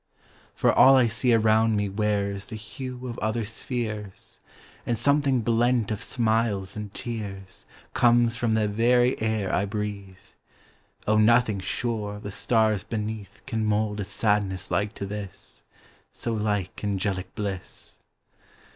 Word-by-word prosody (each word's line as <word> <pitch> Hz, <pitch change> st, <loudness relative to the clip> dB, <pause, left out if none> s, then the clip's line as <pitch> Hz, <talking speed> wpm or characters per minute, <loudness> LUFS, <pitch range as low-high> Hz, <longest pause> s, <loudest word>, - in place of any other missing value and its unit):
"For -, -, +3 dB
all 135 Hz, +1 st, +7 dB
I 130 Hz, -2 st, +5 dB
see 115 Hz, +2 st, +1 dB
around 110 Hz, 0 st, +4 dB
me 105 Hz, 0 st, 0 dB
wearsThe 100 Hz, +1 st, -1 dB
hue 125 Hz, +4 st, -7 dB
of 120 Hz, -2 st, -5 dB
other 110 Hz, +1 st, -1 dB
spheres; 110 Hz, -3 st, -5 dB, 0.4 s
And 120 Hz, -, -1 dB
something 140 Hz, +1 st, +2 dB
blent 115 Hz, 0 st, +2 dB
of 105 Hz, 0 st, -3 dB
smiles 110 Hz, -5 st, 0 dB
and 105 Hz, -1 st, -6 dB
tearsComes 115 Hz, +3 st, -1 dB
from 115 Hz, -1 st, 0 dB
the 110 Hz, -1 st, +2 dB
very 120 Hz, +4 st, +2 dB
air 110 Hz, -3 st, 0 dB
I 100 Hz, -, +2 dB
breathe.O, 105 Hz, +1 st, -5 dB
nothing, 110 Hz, -2 st, +4 dB
sure, 105 Hz, 0 st, -3 dB
the 105 Hz, 0 st, -7 dB
stars 110 Hz, -2 st, +2 dB
beneathCan 110 Hz, 0 st, -4 dB
mould 105 Hz, 0 st, 0 dB
a -, -, -1 dB
sadness 100 Hz, -2 st, -1 dB
like 105 Hz, +2 st, 0 dB
to 100 Hz, -, -4 dB
this,—So 105 Hz, +3 st, -8 dB
like 105 Hz, -4 st, -2 dB
angelic 100 Hz, -2 st, -2 dB
bliss." 100 Hz, -4 st, -5 dB
110 Hz, 120 wpm, -26 LUFS, 100-115 Hz, 0.4 s, all